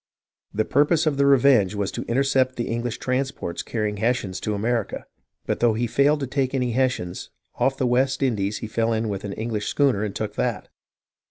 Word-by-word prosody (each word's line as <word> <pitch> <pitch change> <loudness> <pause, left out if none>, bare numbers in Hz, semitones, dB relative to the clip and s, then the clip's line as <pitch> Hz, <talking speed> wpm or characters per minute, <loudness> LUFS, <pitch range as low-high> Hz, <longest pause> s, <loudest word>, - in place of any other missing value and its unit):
The 110 +1 0
purpose 150 +3 +3
of 150 -3 +1
the 140 0 +3
Revenge 125 -7 +4
was 100 -1 -1
to - - -5
intercept 130 +1 +1
the 120 - -3
English 120 0 -2
transports 130 -8 -2
carrying 105 -2 -2
Hessians 115 -4 -1
to 105 - -2
America, 115 +1 -2 0.4
but - - -1
though 120 -2 +3
he 120 +2 0
failed 140 +6 +2
to - - 0
take 135 0 -1
any 125 -2 0
Hessians, 120 -8 -1 0.3
off 135 +2 +1
the 130 - 0
West 130 +2 +1
Indies 105 -5 0
he - - -5
fell 115 +1 0
in 110 0 -1
with 100 -2 -4
an 100 - -4
English 110 -1 -3
schooner 135 -8 +2
and 105 -2 -4
took - - -3
that. - - -2
120 Hz, 195 wpm, -24 LUFS, 105-135 Hz, 0.4 s, Revenge